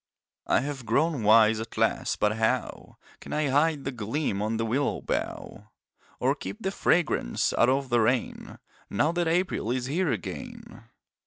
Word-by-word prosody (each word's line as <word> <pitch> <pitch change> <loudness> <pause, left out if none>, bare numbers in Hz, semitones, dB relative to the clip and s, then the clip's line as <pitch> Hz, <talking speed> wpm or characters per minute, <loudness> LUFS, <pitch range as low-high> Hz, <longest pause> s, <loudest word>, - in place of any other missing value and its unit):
I - - +3
have 135 -3 -5
grown 155 -3 +1
wise 110 +1 +5
at 110 0 -7
last - - 0
but 105 +1 +1
how 110 0 -2 0.2
Can - - -8
I 150 -2 0
hide 145 +1 +2
the 135 - -3
gleam 115 -2 -2
on 110 +2 -1
the 115 - -1
willow 130 +6 0
bough, 105 +1 -4 0.5
Or 130 +2 +2
keep 145 - -7
the 190 - 0
fragrance 165 - +1
out 120 - +3
of 135 0 0
the 120 -1 +3
rain 120 +3 -1 0.3
Now 150 +10 +1
that 175 0 -1
April 170 - 0
is 125 0 -1
here 160 +5 0
again? 100 -8 -7
130 Hz, 165 wpm, -27 LUFS, 110-150 Hz, 0.5 s, wise